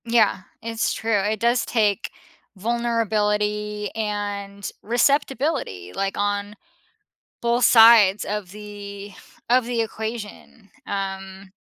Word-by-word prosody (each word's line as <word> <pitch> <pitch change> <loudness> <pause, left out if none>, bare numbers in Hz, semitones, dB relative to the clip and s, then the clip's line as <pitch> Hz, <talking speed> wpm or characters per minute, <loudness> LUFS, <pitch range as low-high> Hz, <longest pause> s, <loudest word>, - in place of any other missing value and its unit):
Yeah, 230 -4 +3 0.2
it's 225 0 -1
true. 220 -2 0
It 210 +2 -1
does 235 +1 +2
take 210 -4 0 0.4
vulnerability 210 -2 -1
and 205 -2 -4
receptibility, 255 - 0
like, 195 0 -2
on 205 0 -1 0.9
both 235 +1 +2
sides 225 -4 +7
of 205 -3 -4
the 205 -1 -9 0.4
of 250 0 +4
the 240 -1 -1
equation. 220 -1 -7 0.2
Um, 195 -1 -5
210 Hz, 100 wpm, -23 LUFS, 200-230 Hz, 0.9 s, sides